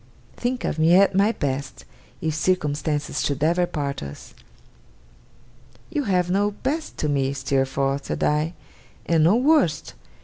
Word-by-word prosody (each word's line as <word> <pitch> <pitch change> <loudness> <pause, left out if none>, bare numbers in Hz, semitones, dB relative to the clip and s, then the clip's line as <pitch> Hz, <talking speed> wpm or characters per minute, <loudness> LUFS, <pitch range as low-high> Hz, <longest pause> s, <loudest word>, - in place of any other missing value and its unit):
Think 250 +1 -2
of 160 - -2
me 165 +2 +5
at 195 +1 +5
my 200 +3 +3
best, 140 -7 -4 0.4
if 160 -1 -1
circumstances 150 -3 -1
should 140 0 -1
ever 175 +3 +2
part 140 -4 -3
us!' 70 0 -9 1.6
'You 295 -4 -1
have 180 -3 +1
no 200 +2 +2
best 280 +10 -4
to 150 - -1
me, 140 -2 0
Steerforth,' 135 +1 -1
said - - -3
I, 155 +3 +1 0.5
'and 165 -2 +3
no 175 +7 +5
worst. 255 - +2
160 Hz, 140 wpm, -23 LUFS, 140-195 Hz, 1.6 s, me